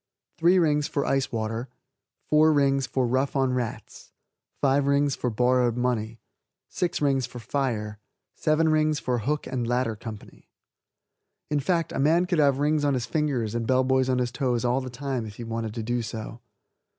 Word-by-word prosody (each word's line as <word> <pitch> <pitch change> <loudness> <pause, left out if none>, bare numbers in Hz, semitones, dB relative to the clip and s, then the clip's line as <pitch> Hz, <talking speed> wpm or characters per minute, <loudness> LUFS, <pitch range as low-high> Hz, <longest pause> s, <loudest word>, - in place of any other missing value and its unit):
Three 175 +3 +5
Rings 150 -4 +2
for 140 - -2
Ice 135 -1 0
Water. 115 +2 -3 0.6
Four 155 +1 +4
Rings 140 -2 +2
for 130 -2 0
Rough 130 +4 0
on 135 -2 +2
Rats. 125 -3 -5 0.5
Five 140 0 +2
Rings 140 0 +2
for 125 - -2
Borrowed 125 +1 +2
Money. 115 -3 -1 0.5
Six 175 -4 -2
Rings 135 -3 +1
for - - -11
Fire. 115 -5 -2 0.3
Seven 160 +1 +2
Rings 155 -1 +2
for 125 -1 -1
Hook 145 +7 -2
and 125 -3 -3
Ladder 120 -2 0
Company. 110 -1 -10 1.0
In 150 - +2
fact, 165 +2 0
a - - -3
man 160 +6 +3
could 180 -3 0
have 140 -3 +4
rings 150 +1 +1
on 140 -2 +2
his 125 -2 -2
fingers 125 -4 -1
and 115 -1 -2
bell 130 0 +3
boys 130 0 +2
on 130 - +2
his 125 -1 -1
toes 125 -2 -1
all 125 +2 +1
the 130 - -6
time 125 -2 -4
if 105 - -10
he 120 - -7
wanted 115 -1 -4
to 115 - -3
do 120 +2 -1
so. 115 +1 -7
130 Hz, 185 wpm, -26 LUFS, 120-145 Hz, 1.0 s, Three